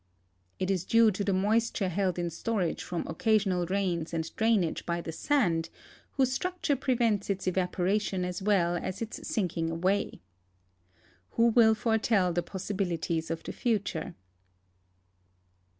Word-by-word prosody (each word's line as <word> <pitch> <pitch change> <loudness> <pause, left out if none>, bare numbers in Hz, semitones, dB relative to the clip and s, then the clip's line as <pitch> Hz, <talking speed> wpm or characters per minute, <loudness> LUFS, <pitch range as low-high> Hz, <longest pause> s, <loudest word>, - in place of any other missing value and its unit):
It 185 +1 -1
is 185 -3 0
due 225 +2 +5
to 200 +1 -3
the 200 - 0
moisture 205 +1 +1
held 185 0 0
in 175 -1 -2
storage 185 0 -2
from 175 -2 -4
occasional 195 -6 +1
rains 175 -4 -1
and 165 0 -4
drainage 220 -7 +1
by 170 0 -2
the 170 - -5
sand, 170 - +1 0.4
whose 265 -2 +2
structure 355 +1 -1
prevents 235 -7 0
its 195 -1 -2
evaporation 185 +1 0
as 180 +1 -4
well 190 -4 +2
as 185 +5 -4
its 225 - -7
sinking 175 -5 -1
aw^ay. 190 +3 0 1.2
Who 230 0 +5
will 225 -1 +5
foretell 220 -5 +1
the 175 - +1
possibilities 175 -3 -3
of 165 0 -4
the - - -6
future? 205 -5 -2
195 Hz, 135 wpm, -29 LUFS, 175-220 Hz, 1.2 s, due